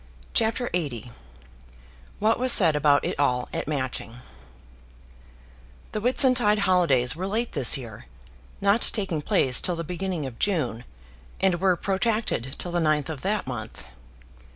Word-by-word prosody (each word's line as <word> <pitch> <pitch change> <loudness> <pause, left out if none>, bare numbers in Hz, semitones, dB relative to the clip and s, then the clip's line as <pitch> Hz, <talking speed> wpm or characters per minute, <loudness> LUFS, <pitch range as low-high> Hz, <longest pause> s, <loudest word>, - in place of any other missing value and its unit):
CHAPTER 230 +2 +1
LXXX 130 -9 -3 1.1
What 220 +3 +1
Was 255 0 +3
Said 165 -9 +5
About 145 -1 +3
It - - -4
All 125 -3 +1
at - - -4
Matching 130 -6 -3 1.8
The - - -3
Whitsuntide 245 -3 +3
holidays 145 -10 +2
were 185 +3 -4
late 225 +4 -2
this 140 -4 +5
year, 115 - -10 0.5
not 200 +3 +3
taking 190 -8 -1
place 130 -3 +2
till 180 - 0
the 170 - -4
beginning 180 -2 -4
of 125 -3 -9
June, 155 - -1 0.5
and 185 -3 +2
were 190 -2 +3
protracted 195 - -2
till 175 - -4
the 175 - 0
9th 155 -2 0
of 150 -4 -6
that 205 +1 -1
month. 115 -4 -7
170 Hz, 140 wpm, -25 LUFS, 135-200 Hz, 1.8 s, Said